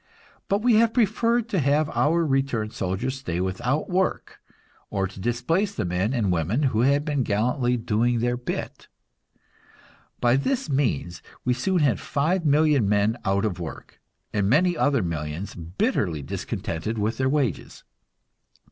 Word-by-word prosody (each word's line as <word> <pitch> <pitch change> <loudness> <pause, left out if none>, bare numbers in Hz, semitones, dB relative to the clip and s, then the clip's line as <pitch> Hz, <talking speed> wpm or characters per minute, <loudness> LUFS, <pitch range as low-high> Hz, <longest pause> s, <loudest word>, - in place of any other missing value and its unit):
But 200 +2 0
we 240 -3 +5
have 225 0 +3
preferred 230 +1 +2
to 195 - 0
have 145 +2 +2
our 165 +3 +2
returned 135 -6 0
soldiers 105 +9 -2
stay 85 -10 -3
without 95 +11 -1
work, 185 +1 -1 0.5
or 95 -1 -1
to 95 +1 -8
displace 165 - 0
the 110 - -2
men 90 +5 0
and 115 -8 0
women 90 - 0
who 110 - +1
had 140 +3 +3
been 145 -3 0
gallantly 120 +3 +1
"doing 115 +2 +1
their 120 +1 0
bit." 125 0 -5 1.3
By 120 +1 +3
this 200 - -1
means 95 - -1 0.2
we 125 - +3
soon 180 +10 0
had 130 -7 +2
five 165 +4 0
million 145 -6 +3
men 105 +2 +2
out 100 0 +1
of 90 -4 -2
work, 85 -2 -8 0.3
and 100 -2 +1
many 175 +7 +3
other 140 - +2
millions 85 +3 -4
bitterly 85 -2 -1
discontented 85 +9 -4
with 110 +3 -1
their 130 0 +2
wages. 135 - -2
120 Hz, 150 wpm, -25 LUFS, 100-150 Hz, 1.3 s, we